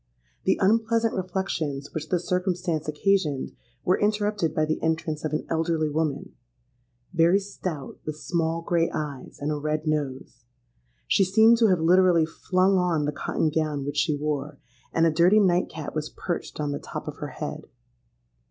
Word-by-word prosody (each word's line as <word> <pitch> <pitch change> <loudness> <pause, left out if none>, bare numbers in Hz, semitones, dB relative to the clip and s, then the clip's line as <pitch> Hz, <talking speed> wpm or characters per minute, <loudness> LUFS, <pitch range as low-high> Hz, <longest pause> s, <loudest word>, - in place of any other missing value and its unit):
The - - +3
unpleasant 225 +2 +2
reflections 170 -7 -3
which 155 -1 -5
this 175 -1 -1
circumstance 180 -3 -1
occasioned 150 -3 0 0.3
were 180 - +3
interrupted 210 -5 +1
by 155 - +2
the 155 0 -2
entrance 160 -1 -1
of 155 - -2
an 155 - -2
elderly 160 -1 0
woman,—very 125 +2 -2
stout, 185 -7 -6
with 155 - -4
small 165 0 -1
grey 170 -1 +1
eyes, 145 -4 -5
and 145 +1 -2
a - - 0
red 155 +1 -2
nose. 145 -6 -3 0.6
She 195 - +4
seemed 220 +5 +5
to 230 - +5
have 185 -4 +3
literally 175 -1 +5
flung 185 +4 +1
on 170 -4 +1
the 150 - 0
cotton 155 +2 -1
gown 150 -3 -1
which 145 +1 -4
she 150 0 +2
wore; 150 0 -3 0.3
and 165 - +3
a 165 - +4
dirty 175 +7 +5
night 180 -3 +3
cap 155 -2 -6
was 155 -1 -3
perched 175 -3 -5
on 145 -1 -1
the 145 - -3
top - - -7
of - - -6
her - - -5
head. - - -6
160 Hz, 165 wpm, -26 LUFS, 150-185 Hz, 0.6 s, seemed